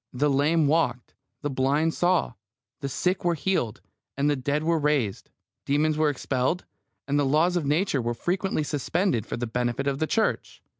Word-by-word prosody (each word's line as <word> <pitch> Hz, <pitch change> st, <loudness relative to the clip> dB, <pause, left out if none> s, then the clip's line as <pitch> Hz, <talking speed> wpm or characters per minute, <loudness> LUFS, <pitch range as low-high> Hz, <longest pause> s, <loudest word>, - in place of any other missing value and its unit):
The 145 Hz, +3 st, +1 dB
lame 150 Hz, +4 st, +3 dB
walked, 140 Hz, -5 st, 0 dB, 0.3 s
the 145 Hz, -, -1 dB
blind 140 Hz, +5 st, +1 dB
saw, 175 Hz, -7 st, +1 dB, 0.5 s
the 140 Hz, -2 st, -4 dB
sick 180 Hz, +8 st, -1 dB
were 175 Hz, -1 st, +2 dB
healed, 140 Hz, -, -1 dB, 0.4 s
the 145 Hz, +1 st, +2 dB
dead 145 Hz, +3 st, -1 dB
were 165 Hz, 0 st, +2 dB
raised, 145 Hz, -9 st, 0 dB, 0.3 s
demons 150 Hz, +2 st, +1 dB
were 155 Hz, 0 st, +2 dB
expelled, 135 Hz, +4 st, -1 dB, 0.4 s
and 145 Hz, +1 st, +1 dB
the -, -, +3 dB
laws 155 Hz, +6 st, +2 dB
of 165 Hz, -5 st, 0 dB
Nature 150 Hz, -2 st, +1 dB
were 120 Hz, 0 st, -2 dB
frequently 185 Hz, +3 st, -1 dB
suspended 150 Hz, -, -1 dB
for -, -, -4 dB
the 120 Hz, -, -2 dB
benefit 120 Hz, +3 st, -2 dB
of 140 Hz, -1 st, -1 dB
the 155 Hz, -, 0 dB
Church. 220 Hz, +5 st, -1 dB
145 Hz, 170 wpm, -26 LUFS, 135-165 Hz, 0.5 s, lame